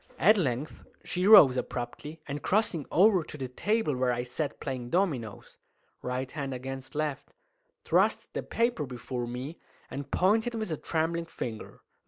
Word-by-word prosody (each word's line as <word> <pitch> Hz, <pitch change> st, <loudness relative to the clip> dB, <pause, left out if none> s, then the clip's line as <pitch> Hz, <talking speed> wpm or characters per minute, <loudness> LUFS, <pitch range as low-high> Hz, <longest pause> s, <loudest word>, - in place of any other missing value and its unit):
At 215 Hz, +6 st, +6 dB
length 145 Hz, -, -2 dB, 0.2 s
she 180 Hz, +2 st, -1 dB
rose 140 Hz, -12 st, +9 dB
abruptly, 125 Hz, +6 st, -5 dB
and, 145 Hz, 0 st, -4 dB
crossing 190 Hz, -8 st, +1 dB
over 190 Hz, 0 st, +5 dB
to 155 Hz, -, -9 dB
the 130 Hz, -2 st, -4 dB
table 205 Hz, -, 0 dB
where 125 Hz, 0 st, +1 dB
I 120 Hz, 0 st, -1 dB
sat 130 Hz, +4 st, -4 dB
playing 130 Hz, -3 st, -4 dB
dominoes 135 Hz, -, -2 dB, 0.4 s
(right 130 Hz, +1 st, -3 dB
hand 140 Hz, -3 st, -4 dB
against 135 Hz, +2 st, -7 dB
left), 150 Hz, -2 st, -3 dB, 0.5 s
thrust -, -, +1 dB
the -, -, -2 dB
paper 230 Hz, -, 0 dB
before 125 Hz, 0 st, -5 dB
me, 125 Hz, +7 st, -6 dB, 0.3 s
and 140 Hz, 0 st, -6 dB
pointed 220 Hz, +8 st, +2 dB
with 220 Hz, -5 st, -3 dB
a 155 Hz, -, -1 dB
trembling 165 Hz, +2 st, -1 dB
finger. 115 Hz, -8 st, -7 dB
145 Hz, 155 wpm, -29 LUFS, 125-175 Hz, 0.5 s, rose